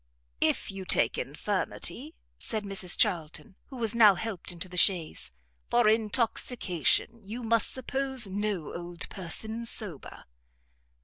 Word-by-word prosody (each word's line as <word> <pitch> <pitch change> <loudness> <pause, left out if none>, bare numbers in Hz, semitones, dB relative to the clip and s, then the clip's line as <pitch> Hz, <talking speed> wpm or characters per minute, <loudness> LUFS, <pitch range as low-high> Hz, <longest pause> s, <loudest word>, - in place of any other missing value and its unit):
"If - - +1
you 195 -1 -6
take - - +2
infirmity," - - -3 0.2
said 215 -1 -2
Mrs 195 -3 +2
Charlton, 170 +4 0
who 265 - -9
was 225 -3 -1
now 215 -4 +7
helped 200 -3 -3
into 175 +2 -5
the 180 - -11
chaise, 175 - +2 0.4
"for 240 -2 +4
intoxication, 225 - +1
you 225 +5 -6
must 230 -1 +2
suppose 265 -1 0
no 195 -4 -2
old 175 -2 -5
person 220 +6 -5
sober." 190 -11 -5
205 Hz, 125 wpm, -29 LUFS, 180-230 Hz, 0.4 s, now